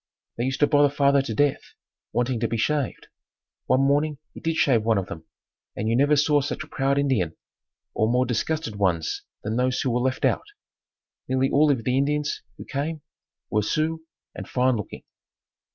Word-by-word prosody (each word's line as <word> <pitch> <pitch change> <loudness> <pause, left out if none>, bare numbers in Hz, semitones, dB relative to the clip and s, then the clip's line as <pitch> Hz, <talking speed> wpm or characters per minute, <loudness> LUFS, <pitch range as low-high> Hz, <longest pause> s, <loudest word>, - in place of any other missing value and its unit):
They 120 - -2
used 135 +1 -2
to - - +7
bother 145 0 +4
father 140 -1 +3
to 115 -5 -4
death 145 +3 +2 0.5
wanting 120 0 0
to 115 - 0
be 115 - -2
shaved. 145 +3 -1 0.6
One 130 +1 +3
morning 145 +2 +2 0.2
he - - -9
did 165 0 -1
shave 130 -7 +3
one 110 0 +2
of 95 - -1
them 80 -2 -9 0.5
and 110 - -2
you 115 - +2
never 145 +4 +4
saw 150 0 +3
such 145 +2 -3
a - - -14
proud 140 -2 0
Indian, 125 - 0 0.6
or 110 - +1
more 125 +1 +3
disgusted 130 0 -2
ones 90 -5 0 0.2
than 110 +2 -2
those 125 0 +1
who 130 - 0
were 120 - +1
left 130 +1 0
out. - - +1 0.8
Nearly 130 +1 +1
all 150 +2 +4
of 130 -5 +1
the 125 +3 +1
Indians 150 +1 0 0.2
who - - -9
came 150 +2 -3 0.5
were 105 - +2
Sioux 160 +8 -1 0.3
and - - -8
fine 130 0 +2
looking. 105 -4 -6
135 Hz, 185 wpm, -25 LUFS, 115-145 Hz, 0.8 s, to